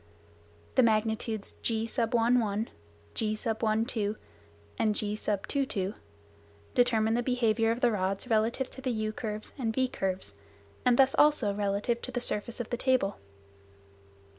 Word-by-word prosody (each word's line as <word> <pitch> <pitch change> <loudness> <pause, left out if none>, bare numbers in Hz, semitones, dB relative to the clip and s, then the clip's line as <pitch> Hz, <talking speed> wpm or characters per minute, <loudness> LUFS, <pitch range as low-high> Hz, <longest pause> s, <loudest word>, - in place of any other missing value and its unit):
The - - +5
magnitudes 220 -1 +1
g, 225 -1 0
g 230 - -7 0.2
and 225 -2 +2 1.3
g, 210 -2 -1 2.6
determine 225 -3 +3
the 240 - +2
behaviour 230 -3 +2
of 230 +2 -1
the 245 -2 +4
rods 195 +2 -1
relative 230 +3 +1
to 265 - -8
the 260 - -1
u 215 -2 -1
curves 215 -1 -5
and 230 -3 0
v 260 +3 +1
curves, 190 - -3 0.5
and 245 -1 +4
thus 270 0 +5
also 295 -9 +4
relative 205 +4 0
to 255 - -5
the 245 - -1
surface 235 0 -2
of 240 - -5
the 240 - 0
table. 255 -6 +1
225 Hz, 125 wpm, -30 LUFS, 215-245 Hz, 2.6 s, The